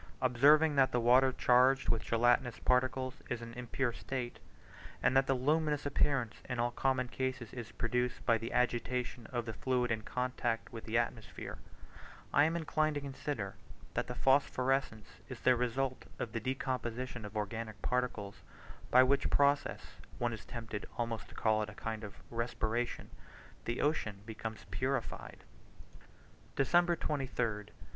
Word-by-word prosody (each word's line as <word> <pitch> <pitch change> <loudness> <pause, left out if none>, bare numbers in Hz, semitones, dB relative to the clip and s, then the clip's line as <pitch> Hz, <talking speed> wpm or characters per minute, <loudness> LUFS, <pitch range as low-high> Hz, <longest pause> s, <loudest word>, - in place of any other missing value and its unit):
Observing 145 +5 +5
that 135 -1 +5
the 125 - +2
water 125 +3 +5
charged 130 +2 +4
with 115 - +2
gelatinous 120 +1 +2
particles 130 +1 +1
is 120 - -1
in 115 0 -7
an - - -11
impure 120 +1 -2
state, 125 0 -4 0.6
and 130 - +4
that 135 0 +5
the 135 - +3
luminous 150 +2 +1
appearance 135 -4 +1
in 125 - -2
all 120 +1 +1
common 130 0 +1
cases 130 -2 -3
is 120 -4 -6
produced 125 +1 -1
by 115 - +5
the 115 +1 -4
agitation 125 -1 0
of 120 -2 -3
the 110 - -4
fluid 125 -3 0
in 110 -1 0
contact 125 -1 -2
with 115 - -7
the 115 +1 0
atmosphere, 115 -2 -3 0.7
I 145 - +6
am 165 +2 +1
inclined 155 -2 +1
to 145 - -2
consider 135 -7 -4 0.4
that - - -1
the 125 - -5
phosphorescence 135 -4 +2 0.2
is 130 -3 -7
the 130 - +5
result 130 +2 -1
of 115 - -4
the 115 - -2
decomposition 130 -1 -3
of 105 0 -8
the - - -4
organic 110 +1 -4
particles, 125 -5 -1 0.5
by 130 +1 +7
which 135 +2 +2
process 145 0 +1 0.2
(one 120 -1 0
is 105 -6 -8
tempted 115 -3 -6
almost 115 -2 -3
to - - -14
call 110 -1 +2
it 105 - -3
a 105 - -11
kind 110 0 -4
of 100 -2 -7 0.2
respiration) 115 0 -2 0.5
the 120 +1 -1
ocean 115 -10 0
becomes 110 -1 -6
purified. - - -3 1.1
December 175 +5 +4
23rd. 125 -9 -2
125 Hz, 155 wpm, -34 LUFS, 115-135 Hz, 1.1 s, by